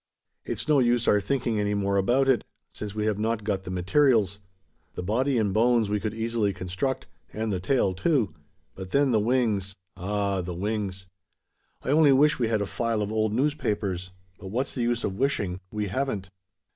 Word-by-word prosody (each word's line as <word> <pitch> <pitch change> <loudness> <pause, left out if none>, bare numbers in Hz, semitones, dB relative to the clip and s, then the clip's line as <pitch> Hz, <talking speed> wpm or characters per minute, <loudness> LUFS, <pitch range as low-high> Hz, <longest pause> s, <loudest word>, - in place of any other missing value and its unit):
It's - - -3
no 150 -2 +4
use 120 -1 +2
our 105 - +4
thinking 120 -2 -1
any 105 0 0
more 100 0 0
about 125 +8 +2
it: 130 -5 +3 0.3
since 105 -1 -6
we 105 0 -1
have 105 -1 0
not 110 0 -1
got 95 -2 -2
the - - -6
materials. 100 +2 +2 0.6
The - - -4
body 125 +7 +1
and 105 -4 +1
bones 115 -1 +3
we 105 - +1
could 110 +1 -3
easily 115 -3 0
construct; 95 +9 -3 0.3
and 110 -1 -2
the 95 - -1
tail 95 0 +1
too. 110 - +1 0.4
But 95 -1 -8
then 140 +4 +3
the 110 - +3
wings 105 -4 0 0.2
ah, 100 +1 -1
the 90 0 -5
wings. 100 -1 -3 0.8
I - - -4
only 150 0 +5
wish 145 +2 +4
we 120 - +2
had 110 -2 +1
a - - -2
file 115 0 -1
of 105 - -4
old 110 -1 +1
newspapers. 105 - -1 0.3
But 95 - -9
what's 125 +8 -2
the 125 - -3
use 120 0 0
of 95 +1 -3
wishing? 100 -9 0
We 105 -1 -3
haven't." 105 -5 -2
105 Hz, 190 wpm, -26 LUFS, 100-120 Hz, 0.8 s, only